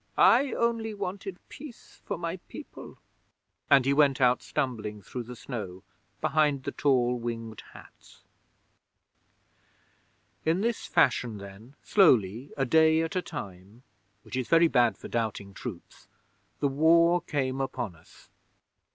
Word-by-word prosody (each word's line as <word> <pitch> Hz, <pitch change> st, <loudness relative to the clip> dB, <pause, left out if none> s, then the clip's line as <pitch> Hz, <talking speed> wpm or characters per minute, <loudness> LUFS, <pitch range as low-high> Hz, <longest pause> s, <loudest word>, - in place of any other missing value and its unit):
"I 260 Hz, +3 st, +5 dB
only 230 Hz, -2 st, -1 dB
wanted 195 Hz, -1 st, -5 dB
peace 270 Hz, -5 st, -13 dB
for -, -, -4 dB
my -, -, -4 dB
people," -, -, -11 dB, 0.7 s
and 135 Hz, -2 st, +6 dB
he 135 Hz, -, +3 dB
went 140 Hz, -2 st, +3 dB
out 125 Hz, -1 st, +3 dB
stumbling 110 Hz, -8 st, -3 dB
through 125 Hz, -, -6 dB
the 125 Hz, +1 st, -9 dB
snow 100 Hz, -8 st, -7 dB, 0.4 s
behind 150 Hz, -3 st, +1 dB
the -, -, -3 dB
tall 125 Hz, -3 st, +1 dB
Winged 115 Hz, -2 st, -5 dB
Hats. -, -, -17 dB, 2.2 s
'In 165 Hz, +4 st, +1 dB
this 230 Hz, +1 st, -2 dB
fashion 115 Hz, -4 st, +2 dB
then, 100 Hz, +7 st, -12 dB
slowly, 125 Hz, -, +3 dB
a 135 Hz, -, +1 dB
day 160 Hz, +3 st, +4 dB
at 165 Hz, +4 st, -4 dB
a 185 Hz, -, +1 dB
time, 100 Hz, -, -9 dB, 0.4 s
which -, -, -8 dB
is 130 Hz, -2 st, -2 dB
very 165 Hz, 0 st, +6 dB
bad 120 Hz, -6 st, +2 dB
for -, -, -9 dB
doubting 110 Hz, -4 st, -3 dB
troops, 100 Hz, -5 st, -9 dB, 0.5 s
the 145 Hz, -, +3 dB
War 170 Hz, +5 st, +4 dB
came 135 Hz, -3 st, -2 dB
upon 120 Hz, -8 st, -4 dB
us. 80 Hz, -, -21 dB
135 Hz, 135 wpm, -28 LUFS, 115-165 Hz, 2.2 s, and